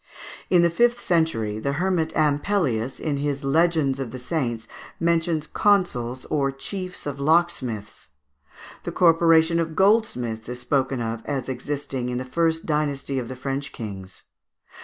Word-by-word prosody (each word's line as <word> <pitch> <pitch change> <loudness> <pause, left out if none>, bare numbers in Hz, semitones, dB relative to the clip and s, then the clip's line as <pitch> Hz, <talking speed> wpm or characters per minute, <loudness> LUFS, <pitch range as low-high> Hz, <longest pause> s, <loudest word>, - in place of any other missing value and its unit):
In 175 -2 +5
the 170 - +3
fifth 240 +6 +3
century, 115 -12 0
the 140 +5 -1
Hermit 165 0 0
Ampelius, 145 - +1
in 150 -3 -1
his 140 0 -2
"Legends 150 -2 +2
of 135 -3 -3
the 130 - -7
Saints," 125 -5 -3 0.3
mentions 165 -2 +1
Consuls 130 - +1
or 140 -2 +1
Chiefs 180 +7 -6
of 140 -1 -4
Locksmiths. 140 -9 0 0.7
The - - -5
Corporation 165 -1 +4
of 165 -1 -2
Goldsmiths 125 - +1
is 125 0 -5
spoken 130 0 0
of 115 0 -3
as 135 -4 -2
existing 130 -1 -3
in 125 - -2
the 130 - -4
first 160 +4 0
dynasty 145 -3 -1
of 120 - -5
the 130 - -6
French 135 +2 -4
kings. 95 -5 -8
145 Hz, 145 wpm, -24 LUFS, 125-165 Hz, 0.7 s, In